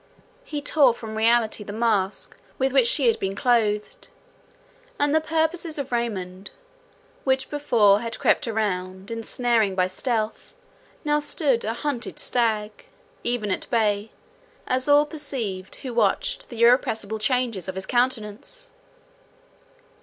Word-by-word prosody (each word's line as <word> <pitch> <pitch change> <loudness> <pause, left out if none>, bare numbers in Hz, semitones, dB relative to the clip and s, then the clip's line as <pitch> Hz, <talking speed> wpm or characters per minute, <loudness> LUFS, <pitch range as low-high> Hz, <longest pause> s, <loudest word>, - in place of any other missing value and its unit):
He 295 -11 -5
tore 280 -5 +4
from 220 -2 -8
reality 225 -1 +2
the 205 - -7
mask 210 -3 -1 0.2
with 265 0 +1
which 260 -3 +4
she 270 +2 +2
had 230 - +3
been 195 0 -2
clothed; 215 -3 0 0.9
and 290 0 +1
the 315 - +4
purposes 320 +1 -1
of 275 -2 -4
Raymond, 195 -6 -3 0.7
which 265 -1 0
before 230 -9 +4
had 230 0 -4
crept - - +2
around, 190 -2 -2
ensnaring 230 -2 +1
by 185 -1 +3
stealth, 215 +3 -3 0.5
now 295 0 +2
stood 290 -4 0
a 220 - -1
hunted 245 -1 -3
stag—even 230 - -2
at - - -3
bay—as 250 - -2
all 290 +1 +6
perceived 260 - -4
who 255 -3 -7
watched - - 0
the 235 -1 -1
irrepressible 220 -3 +3
changes 235 -5 0
of 190 - -4
his 190 0 -5
countenance. 250 - -1
235 Hz, 125 wpm, -24 LUFS, 210-275 Hz, 0.9 s, all